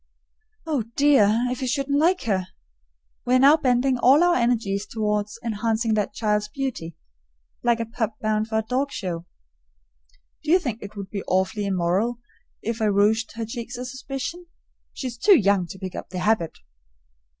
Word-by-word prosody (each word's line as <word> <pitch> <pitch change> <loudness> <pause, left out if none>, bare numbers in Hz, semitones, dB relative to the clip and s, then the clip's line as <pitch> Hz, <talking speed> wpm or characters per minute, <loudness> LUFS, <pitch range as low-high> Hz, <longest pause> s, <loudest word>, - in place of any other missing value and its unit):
Oh 305 -6 0
dear, 245 -5 +4
if 250 - -3
he 260 - -2
shouldn't 280 +2 0
like 355 +4 +2
her! 190 -5 0 0.8
We 250 - +2
are - - +5
now 280 +3 +7
bending 255 -3 +1
all 275 +7 +6
our 350 0 +4
energies 225 - 0
toward 210 -2 -1 0.2
enhancing 225 0 0
that 210 -1 0
child's 210 -1 0
beauty 225 - -4 0.7
like 235 -1 +2
a 230 - -1
pup 225 -1 -3
bound 215 0 0
for 220 -1 0
the - - -32
dog 270 +3 0
show. 175 -6 -5 1.2
Do 300 - -5
you 350 - +7
think 245 - -4
it 205 +1 -9
would 195 -2 -7
be 200 - -3
awfully 190 +2 0
immoral 190 +6 0 0.5
if 225 0 -3
I - - +3
rouged 210 +2 +2
her 230 0 -4
cheeks 240 +1 -6
a 250 - -5
suspicion? 270 +7 -6 0.4
She - - -7
is 240 -2 -5
too 400 - +6
young 200 -3 +2
to 180 - -9
pick 185 -1 -6
up - - -7
the 185 - -6
habit. 190 -3 0
225 Hz, 175 wpm, -24 LUFS, 205-255 Hz, 1.2 s, now